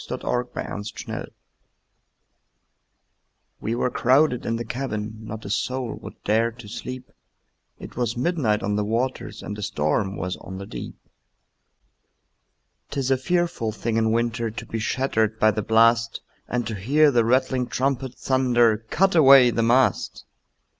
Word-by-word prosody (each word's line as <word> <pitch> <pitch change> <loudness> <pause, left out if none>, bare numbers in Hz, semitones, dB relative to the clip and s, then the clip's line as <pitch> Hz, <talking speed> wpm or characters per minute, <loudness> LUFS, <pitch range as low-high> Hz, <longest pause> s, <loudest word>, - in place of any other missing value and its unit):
Y - - -10
Z - - -5
Ballad 125 0 -1
of 120 - -32
the - - -2 0.4
Tempest - - -6 2.3
WE 115 +2 -2
were 125 +1 0
crowded 130 +1 +2
in 115 - 0
the 115 +1 -4
cabin, 110 -3 -4
Not 110 0 -8
a - - -5
soul 125 +1 -2
would - - -9
dare 110 +3 +2
to 120 -2 -12
sleep, 125 +4 -7 0.7
It - - -11
was 120 -1 -2
midnight 125 -8 0
on 105 0 0
the 105 - +1
waters, 115 0 -2
And 105 - -5
a - - -5
storm 95 +2 -1
was 90 0 -3
on 95 - -9
the 100 - -7
deep. - - -8 1.9
'Tis 135 -2 -2
a - - +5
fearful 170 -6 -1
thing 115 +1 -2
in 110 0 +2
winter 115 0 0
To 115 +1 -7
be 115 - -4
shattered 110 -2 0
by 110 - +5
the 110 - -2
blast, 115 +2 +3 0.3
And 120 -1 -2
to 110 - -4
hear 140 +10 +3
the 120 -3 +3
rattling 130 +1 +1
trumpet 130 -1 -1
Thunder, 120 -4 +2
"Cut 195 +2 +2
away 135 -6 +7
the 115 - 0
mast!" 120 -1 +1
115 Hz, 160 wpm, -24 LUFS, 110-130 Hz, 2.3 s, away